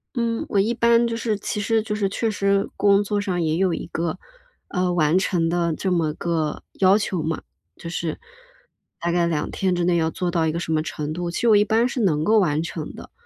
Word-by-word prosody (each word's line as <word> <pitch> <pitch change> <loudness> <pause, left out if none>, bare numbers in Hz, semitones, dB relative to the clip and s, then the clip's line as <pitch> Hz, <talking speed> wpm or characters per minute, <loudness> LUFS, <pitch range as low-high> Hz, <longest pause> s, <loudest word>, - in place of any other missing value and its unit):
嗯， 230 -2 -1
我 200 - 0
一 210 +4 +2
般 235 0 +3
就 230 - -2
是 225 -2 -1
其 210 - -3
实 220 +1 +1
就 215 -1 -3
是 205 -2 0
确 225 +3 -1
实 200 -1 +1
工 200 0 +4
作 205 0 -1
上 185 -4 -1
也 160 0 0
有 185 -2 +2
一 - - -5
个， 170 -1 -3 0.5
呃， 180 -1 0
完 170 0 +3
成 175 -4 +1
的 170 -1 0
这 190 +4 -1
么 160 -4 0
个 160 -2 -2 0.2
要 190 +1 +6
求 195 -5 -1
嘛。 160 0 -3 0.3
就 170 - -8
是 170 -2 -3 0.8
大 170 0 -1
概 175 -1 +2
2 160 -3 -1
天 185 -2 0
之 175 - 0
内 175 0 +2
要 160 -1 +1
做 180 +1 -2
到 165 -2 +1
一 155 - +1
个 165 - -3
什 165 -1 -3
么 155 -1 +2
程 155 -1 -4
度， 175 +1 -3
其 170 - -3
实 240 - +2
我 215 - +7
一 205 - +5
般 225 +3 +2
是 255 - -3
能 155 -7 +2
够 220 +1 +4
完 155 -5 +2
成 165 -2 -5
的， - - -11
180 Hz, 255 characters per minute, -23 LUFS, 165-205 Hz, 0.8 s, 我